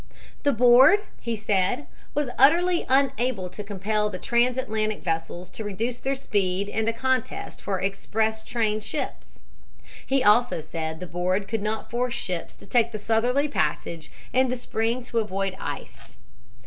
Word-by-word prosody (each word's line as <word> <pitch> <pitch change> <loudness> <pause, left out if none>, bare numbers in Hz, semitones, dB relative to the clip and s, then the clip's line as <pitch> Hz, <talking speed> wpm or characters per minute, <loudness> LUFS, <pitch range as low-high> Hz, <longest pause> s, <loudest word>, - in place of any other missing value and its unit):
The 285 - +3
board, 255 - +7 0.2
he 235 -1 -2
said, 210 +5 0 0.3
was 290 -4 0
utterly 340 +6 +4
unable 255 -7 +1
to 210 - -7
compel 210 +1 -1
the 185 - -5
transatlantic 235 -1 0
vessels 170 +2 -3
to 220 - -6
reduce 225 +4 -3
their 270 +1 -1
speed 200 -6 0
in 220 +1 -1
the 230 - +2
contest 260 +1 -2
for 195 -2 -2
"express 220 +3 -1
train" 220 -2 0
ships. 255 +6 -5 0.7
He 270 -1 +1
also 215 -2 +4
said 160 +1 -5
the - - -4
board 180 +3 -1
could 225 0 -2
not 215 +1 -3
force 245 +1 0
ships 180 -8 -3
to - - -15
take 235 -1 +2
the 215 - -4
southerly 240 +7 +1
passage 160 - -2 0.2
in 260 0 +3
the 255 - -1
spring 235 +1 -1
to 235 -1 -1
avoid 195 -3 -2
ice. - - -7
220 Hz, 155 wpm, -25 LUFS, 195-250 Hz, 0.7 s, board